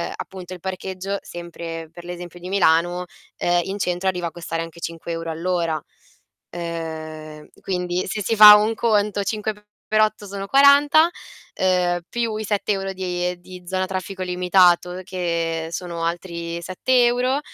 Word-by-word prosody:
appunto 185 -1 -8
il 180 - -9
parcheggio, 190 +1 -4
sempre 165 -2 -7
per 175 +1 -12
l'esempio 175 0 -8
di 180 - -8
Milano, 175 -1 +2 0.3
ehm, 175 0 +2
in 195 +4 -4
centro 180 +1 -1
arriva 180 -2 -2
a - - -6
costare 165 -1 -4
anche 165 0 -8
5 165 0 -6
euro 165 0 -4
all'ora. 165 -2 -1 0.7
Ehm, 155 -2 -6
quindi 180 -1 -2
se 210 +2 -3
si 225 - 0
fa 210 0 +12
un 215 +2 +2
conto 210 -3 +1
5 215 +1 -2 0.3
per 215 0 +2
8 215 -1 +1
sono 195 0 -6
40, 285 +5 +6 0.4
ehm, 180 -1 +1
più 235 -2 -1
i 220 - -3
7 205 0 0
euro 195 0 -3
di 180 -1 -2
di 180 0 -11
zona 185 0 -1
a - - -3
traffico 190 0 -5
limitato 180 0 +3
che 170 -3 -2
sono 170 -1 -4
altri 170 0 -4
7 240 +8 +2
euro, 250 +3 +2
180 Hz, 155 wpm, -22 LUFS, 170-200 Hz, 0.7 s, fa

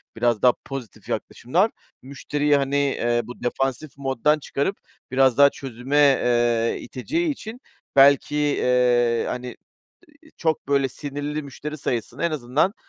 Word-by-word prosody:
biraz 120 -3 +1
daha 125 -1 +6
pozitif 135 -7 -8
yaklaşımlar, 180 - 0 0.3
müşteriyi, 145 +2 0
hani, 140 0 -1
eee, 120 -4 +1
bu 125 +2 -10
defansif 135 +3 -2
moddan 140 +2 +1
çıkarıp 145 +6 -2 0.3
biraz 130 -2 +3
daha 140 0 +7
çözüme, 135 +1 -4
eee, 120 -5 +3
iteceği 320 - -2
için 245 -4 -6 0.3
belki, 140 +1 +5
eee, 125 -5 +2
hani, 125 0 -5 0.7
iii, 310 - -19
çok 160 -4 -1
böyle 140 -1 +2
sinirli 145 +3 -5
müşteri 150 +2 -7
sayısını 120 +1 -3
en 170 - +2
azından 150 - 0
135 Hz, 130 wpm, -23 LUFS, 125-150 Hz, 0.7 s, daha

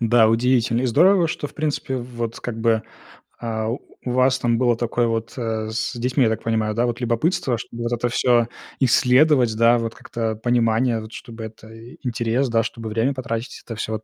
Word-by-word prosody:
Да, 115 -1 +4
удивительно 120 +1 +2
и 130 - +1
здорово, 175 - +4
что, 145 - -3
в - - -16
принципе, 150 -3 -2
вот 120 -2 -5
как 115 -2 -5
бы, 110 -1 +2 0.6
а, 110 -2 -2
у 125 +1 -6
вас 130 +1 +3
там 120 -2 +1
было 120 -1 +3
такое 120 0 0
вот, 115 -1 -2
э, 110 -2 -2
с 110 +1 -2
детьми, 125 +2 +1
я 115 - +4
так 110 - -3
понимаю, 110 -1 0
да. 120 +2 +2
Вот 120 +1 -3
любопытство, 120 +2 0
чтобы 120 +1 -7
это 120 0 0
всё 120 -1 +3 0.3
исследовать, 130 -1 +4
да, 115 +1 +5
вот, 115 -1 -3
как-то 115 -2 -3
понимание, 115 0 +1
вот 110 +1 -10
чтобы 115 -1 -9
это 110 0 -12
и 115 +2 -13
интерес, 120 +2 0
да, 115 0 +2
чтобы 115 -1 -6
время 115 +6 +1
потратить, 120 -1 -5
это 115 - -6
всё 110 0 -4
вот 110 0 -4
115 Hz, 195 wpm, -22 LUFS, 115-125 Hz, 0.6 s, да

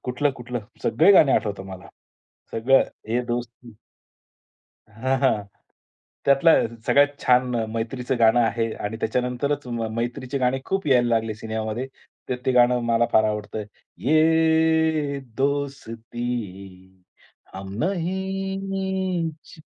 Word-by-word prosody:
कुठलं-कुठलं? 125 -2 -2 0.2
सगळे 195 - +5
गाणे 145 -7 +6
आठवतात 100 -4 -1
मला, 95 -1 -10 0.6
सगळं 130 +4 +4 0.3
ये 120 +2 +1
दोस्ती 120 -1 -5 1.2
हां, 130 +5 -1
हां. 110 -7 +2 0.8
त्यातला 140 +4 +5 0.3
सगळ्यात 145 0 +3
छान 125 0 +3 0.2
मैत्रीचं 120 +2 -3
गाणं 115 +1 +5
आहे 115 -1 0
आणि 110 +2 -3
त्याच्यानंतरच 125 +4 -1
म 115 -2 -3
मैत्रीचे 125 +3 -3
गाणे 130 +1 +1
खूप 195 -3 -2
यायला 125 -3 +4
लागले 115 -2 0
सिनेमामध्ये. 110 +3 -4 0.4
तर 125 - -1
ते 130 - +3
गाणं 125 0 +4
मला 115 0 +2
फार 110 - +5
आवडतं. 105 0 -3 0.3
ये 160 -1 +2 0.2
दोस्ती 115 -9 -4 0.5
हम 95 0 -7
नहीं 190 -1 -2 0.2
छो 155 - -14
125 Hz, 110 wpm, -23 LUFS, 115-145 Hz, 1.2 s, गाणे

